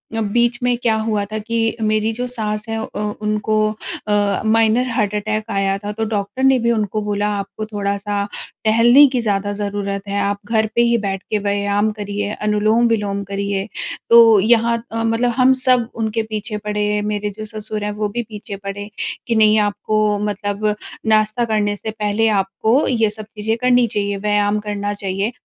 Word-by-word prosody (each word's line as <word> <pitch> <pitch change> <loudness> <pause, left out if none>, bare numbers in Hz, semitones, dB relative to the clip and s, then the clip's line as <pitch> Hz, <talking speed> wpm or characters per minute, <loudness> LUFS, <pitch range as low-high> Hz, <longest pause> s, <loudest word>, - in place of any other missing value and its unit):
अ, 225 - 0
बीच 240 +3 +1
में 245 0 +2
क्या 230 -2 +1
हुआ 220 -2 0
था 215 +2 -5
कि 225 +1 -1
मेरी 215 +1 +1
जो 245 +3 -3
सास 215 -3 -3
है 225 - -1
अ, 220 - -6 0.2
उनको 215 0 0 0.5
अ, 205 -1 +1
माइनर 225 +3 +3
हार्ट 215 -4 0
अटैक 215 +1 -1
आया 195 0 +1
था। 205 +1 -5
तो 225 +1 -3
डॉक्टर 210 +4 -3
ने 265 -1 +5
भी 235 0 +1
उनको 215 -1 -1
बोला 205 0 -1
आपको 200 +2 -5
थोड़ा-सा 200 -1 -2 0.4
टहलने 240 +6 +7
की 250 - +1
ज़्यादा 205 -2 -1
ज़रूरत 200 -1 -3
है, 200 0 -1
आप 200 0 -1
घर 220 0 +1
पे 235 - +4
ही 235 0 +3
बैठ 195 -3 -3
के 215 - +1
व्यायाम 205 +1 0
करिए, 205 -1 -4
अनुलोम-विलोम 210 -1 +1
करिए। 200 0 -3 0.4
तो 230 -3 +8
यहाँ 230 +2 +3
अ, 225 0 -2
मतलब 230 +2 +1
हम 255 +1 +5
सब 250 -3 +3
उनके 225 0 -1
पीछे 215 0 -4
पड़े, 210 0 -1
मेरे 210 0 -2
जो 215 - -4
ससुर 215 -1 -5
हैं 210 - -2
वो 210 0 -2
भी 240 +3 -3
पीछे 210 -1 -7
पड़े, 200 +1 -7 0.4
कि 235 - +1
नहीं 215 0 +5
आपको 210 0 +1
मतलब 210 0 -1 0.3
नाश्ता 215 +2 +2
करने 210 -2 0
से 220 +2 -5
पहले 215 +1 0
आपको 220 +7 +1
ये 225 -4 +2
सब 215 0 -8
चीज़ें 220 +1 -3
करनी 250 -1 +4
चाहिए, 200 -1 -2
व्यायाम 205 0 +1
करना 205 -1 -3
चाहिए। 195 +2 -2
210 Hz, 180 wpm, -19 LUFS, 205-225 Hz, 0.5 s, तो